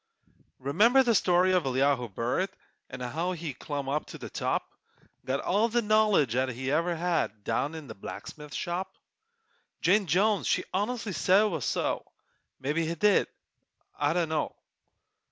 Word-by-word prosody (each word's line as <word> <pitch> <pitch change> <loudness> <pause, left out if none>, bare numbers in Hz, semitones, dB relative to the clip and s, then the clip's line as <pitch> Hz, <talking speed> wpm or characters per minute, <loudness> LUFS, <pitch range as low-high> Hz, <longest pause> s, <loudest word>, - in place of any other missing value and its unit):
Remember 210 - +4
the 240 -2 +3
story 185 -2 +4
of 180 -2 +3
Elihu 130 -2 +1
Burritt, 120 - -1 0.4
An' 130 -1 -8
how 165 +9 -2
he 165 -4 -5
clum 140 +1 -5
up 145 +3 -1
to - - -8
the - - -9
top, - - -1 0.6
Got 135 +1 -1
all 210 +5 +2
the 240 +1 +1
knowledge 210 - +3
'at 130 +1 +1
he 130 +2 -3
ever 170 +3 +1
had 165 -11 -1
Down 150 +9 -1
in 155 -3 -8
a - - -5
blacksmithing 150 +8 -9
shop? 185 +2 -3 0.9
Jane 200 +1 +4
Jones 200 +6 +2
she - - +2
honestly 210 +1 -1
said 185 +7 +4
it - - +3
was 160 - -3
so! - - -1 0.6
Mebbe 145 +4 -2
he 165 0 0
did 205 +4 +3 0.7
I 145 +1 +1
dunno! 160 -3 -1
165 Hz, 155 wpm, -28 LUFS, 140-195 Hz, 0.9 s, Remember